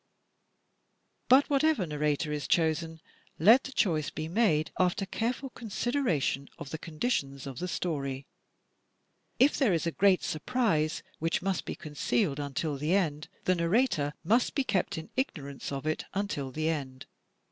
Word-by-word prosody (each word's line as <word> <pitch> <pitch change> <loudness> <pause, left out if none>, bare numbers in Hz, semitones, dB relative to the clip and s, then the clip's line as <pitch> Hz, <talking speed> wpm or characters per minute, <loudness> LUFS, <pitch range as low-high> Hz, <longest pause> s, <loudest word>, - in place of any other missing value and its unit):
But 265 +3 +7
whatever 290 - +2
narrator 150 0 -1
is 145 -3 -3
chosen, 160 -1 +1 0.4
let 225 - +6
the 270 - -6
choice 160 - +1
be 155 0 -5
made 165 -6 +2
after 185 +2 +2
careful 245 +6 -2
consideration 220 - -1
of 140 - -8
the 160 - -4
conditions 150 - -2
of 135 -3 -6
the 180 - -2
story. 140 -7 -3 1.1
If 275 +4 +5
there 250 -10 +4
is 165 0 0
a 170 - 0
great 190 +1 +3
surprise 160 -5 0 0.2
which 165 +2 0
must 195 -1 -1
be - - -4
concealed 150 0 -1
until 145 +1 -2
the 150 +6 +1
end, 155 -6 0 0.2
the 185 - +3
narrator 170 - +1
must 230 +8 +2
be 280 - +2
kept 195 -10 0
in 160 0 -7
ignorance 145 - -3
of 140 +1 -4
it 155 0 -1
imtil 170 -10 -2
the 155 +4 -2
end. 135 -5 -4
165 Hz, 150 wpm, -29 LUFS, 150-215 Hz, 1.1 s, But